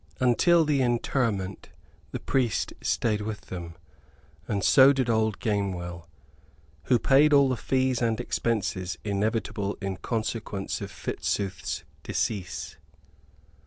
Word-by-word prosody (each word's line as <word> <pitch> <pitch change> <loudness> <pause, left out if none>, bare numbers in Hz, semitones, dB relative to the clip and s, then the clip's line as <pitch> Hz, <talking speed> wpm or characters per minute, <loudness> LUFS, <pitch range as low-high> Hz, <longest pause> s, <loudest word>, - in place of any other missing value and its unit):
Until 160 +7 +4
the 145 -3 +2
interment 115 -5 -1 0.4
the - - -5
priest 130 -5 0
stayed 105 -3 0
with 105 -1 -4
them, 85 -2 -6 0.7
and 100 -2 -1
so 135 +6 +7
did 130 -3 +1
old 110 -2 +1
Gamewell, 90 -5 -2 0.8
who 125 - +4
paid 145 +5 +4
all 140 -1 +6
the 130 - +1
fees 130 0 0
and 115 -1 +1
expenses 100 -7 -1
inevitable 105 0 -1
in 95 -2 -3
consequence 110 -1 -3
of - - -5
Fitzooth's 95 -2 -3 0.2
decease. 95 -5 -3
110 Hz, 115 wpm, -27 LUFS, 100-125 Hz, 0.8 s, so